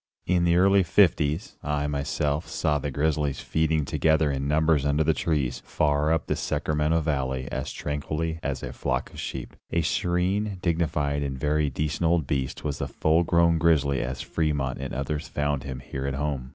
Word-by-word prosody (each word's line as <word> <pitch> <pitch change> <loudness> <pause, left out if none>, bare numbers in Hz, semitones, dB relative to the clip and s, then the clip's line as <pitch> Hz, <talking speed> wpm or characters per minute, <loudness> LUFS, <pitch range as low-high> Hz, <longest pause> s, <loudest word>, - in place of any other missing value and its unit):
In 90 -1 +2
the 85 0 +3
early 95 +2 +5
'50s, 85 -2 +2
I, 75 0 -1
myself, 75 +1 -1
saw 75 -2 0
the 75 - -3
grizzlies 75 0 0
feeding 80 -1 0
together 80 0 +2
in 70 0 -2
numbers 80 -1 +3
under 75 +2 +2
the 80 +1 +3
trees, 70 -5 -1
far 75 +1 +1
up 80 0 +1
the - - -1
Sacramento 75 +2 0
Valley, 65 -4 -1
as 65 - -3
tranquilly 75 +3 -3
as 70 -4 -3
a - - -5
flock - - -2
of - - -9
sheep. - - -5
A 85 0 +1
serene, 95 +4 0
dignified 75 -4 0
and 70 -2 -3
very 75 +2 +1
decent 75 +5 -1
old 85 -3 +2
beast 65 -1 -2
was 75 -3 -3
the - - -2
full 80 +2 +2
grown 85 -1 +3
grizzly 75 -5 +3
as 65 +1 -4
Fremont 75 -5 -1
and 70 0 -5
others 75 +3 -3
found 70 -1 -1
him 65 -2 -5
here 70 -1 -5
at 70 - -2
home. 70 -3 -2
75 Hz, 180 wpm, -26 LUFS, 70-80 Hz, -, early